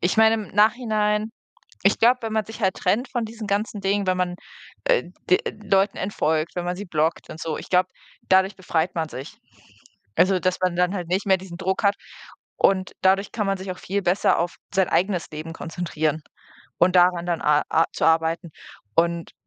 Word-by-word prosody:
ich 175 +5 0
meine 220 0 +6
im 215 -4 -5
Nachhinein 215 -1 +2 0.5
ich - - +3
glaube, 245 +2 +5
wenn 225 -1 -3
man 220 -1 0
sich 225 +3 -10
halt 190 -1 +2
trennt 220 +8 0
von 240 -3 -1
diesen 220 -1 -7
ganzen 205 +1 -1
Dingen, 195 +1 0
wenn 185 - +2
man, 180 -1 -1 0.5
äh, - - +3 0.3
d 180 - +7
äh, - - -1
Leuten 195 0 +2
entfolgt, 160 -4 -1
wenn 175 - -2
man 180 0 -2
sie 205 - -6
blockt 160 -1 -1
und - - -9
so, 160 -2 -3
ich - - -9
glaube, 185 0 +3 0.4
dadurch 190 +1 +3
befreit 175 -2 -1
man 165 -2 -2
sich. 135 -1 -9 0.8
Also, 185 +1 +3
dass 185 0 0
man 180 -1 +1
dann 180 +2 +1
halt 180 -4 -4
nicht 190 +3 -1
mehr 190 - +5
diesen 180 -2 -10
Druck 190 +2 -1
hat 200 - +4 0.6
und 190 -1 +2
dadurch 195 +2 +3
kann 210 -3 -1
man 195 0 0
sich 190 0 -6
auch 180 - -12
viel 200 +2 -2
besser 180 +3 +2
auf 175 +1 -2 0.2
sein 190 -1 +3
eigenes 180 -2 0
Leben 155 +1 -7
konzentrieren 160 -2 -3 0.6
und 180 +1 +4
daran 175 -1 +4
dann 170 -2 -1
a 150 0 +3
a 165 - +4
zu - - -2
arbeiten. 165 +1 +2 0.5
Und, 170 0 +1
185 Hz, 200 wpm, -23 LUFS, 170-205 Hz, 0.8 s, d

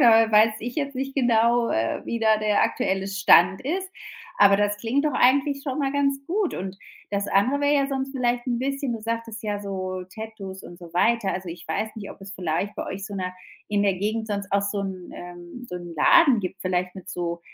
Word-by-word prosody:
da 225 -1 +6
weiß 215 +1 +6
ich 240 +2 -5
jetzt 280 -3 -3
nicht 270 +1 -3
genau, 235 -2 +3
äh, 110 +1 -1
wie 235 - -3
da 220 -1 +4
der 210 -1 +2
aktuelle 190 0 -1
Stand 190 -2 +5
ist. 370 +7 -2 0.5
Aber 200 -1 +7
das 205 0 +1
klingt 245 +7 0
doch 300 - 0
eigentlich 275 +2 +3
schon 270 -1 -3
mal 275 0 0
ganz 275 -1 +1
gut. 385 0 0
Und, 190 +1 -5 0.3
das 200 0 -1
andere 250 +10 +2
wär 285 - +3
ja 280 -2 +3
sonst 270 0 -3
vielleicht 245 -2 0
'n 240 -2 0
bisschen 275 0 -2
du 230 - -5
sagtest 230 0 -4
ja 205 -1 -2
so 185 -2 -4
Tattoos 215 -4 -8
und 175 - -11
so 170 -2 -12
weiter. 225 +3 +2
Also 180 -1 -5
ich 170 0 -9
weiß 185 +7 -1
nicht, 205 -2 -7
ob - - -12
es 195 0 -9
vielleicht 180 +3 -2
bei - - -4
euch 195 +2 -5
so 205 - -7
'ne 185 -1 -3 0.3
in 205 -1 +1
der 200 -2 +2
Gegend 215 +4 -2
sonst 200 -2 -4
auch 200 - +4
so 200 0 -2
'n, 190 -2 -6
ähm 175 +7 -10
so 180 - -6
'n 175 -1 -8
Laden 275 - +6
gibt, 185 -1 -5
vielleicht 180 0 -1
mit 190 -3 -11
so, 170 -1 -3
210 Hz, 220 wpm, -24 LUFS, 190-250 Hz, 0.5 s, Aber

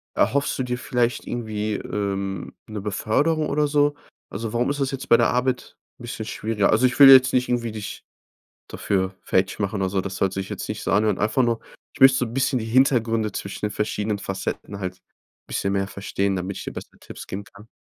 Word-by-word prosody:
Erhoffst 140 +1 +1
du - - +1
dir 125 -1 -2
vielleicht 125 -1 -1
irgendwie, 110 -3 -3
ähm, 100 -2 -3
'ne 105 -2 -6
Beförderung 145 +10 0
oder 150 +1 +1
so? 145 0 +2 0.3
Also, 110 +2 -5
warum 120 +2 +1
ist 145 +1 -2
das 135 -1 0
jetzt 135 -1 -6
bei 115 - +7
der - - +3
Arbeit 125 0 -1 0.2
'n - - -12
bisschen 115 -2 -5
schwieriger? 110 -1 0
Also, 110 +4 +4
ich 125 - +1
will 140 -1 +11
jetzt 130 -1 +8
nicht 125 0 +1
irgendwie 120 -2 0
dich 105 -1 -7 0.7
dafür 95 -1 -1
fertig 95 +2 0
machen 100 0 -1
oder 95 - +1
so. 95 0 0
Das 95 0 -5
sollte 95 0 0
ich 95 - -5
jetzt - - -5
nicht - - -4
so - - -1
anhören. 105 -1 +2
Einfach 110 +5 +2
nur 115 -1 +1 0.3
ich - - -15
möcht 135 0 +8
so 130 - +1
'n 115 - -8
bisschen 130 0 +1
die 110 - -4
Hintergründe 115 -3 +2
zwischen 100 +1 -6
den 105 - -2
verschiedenen 105 0 -2
Facetten 95 +1 -5
halt 90 -1 -5 0.5
bisschen 100 - -1
mehr 95 0 0
verstehen, 100 0 -2
damit 95 +1 -4
ich - - -6
dir - - -5
besser - - -10
Tipps - - -10
geben 100 +2 -6
kann. 105 +2 -16
110 Hz, 215 wpm, -23 LUFS, 100-125 Hz, 0.7 s, will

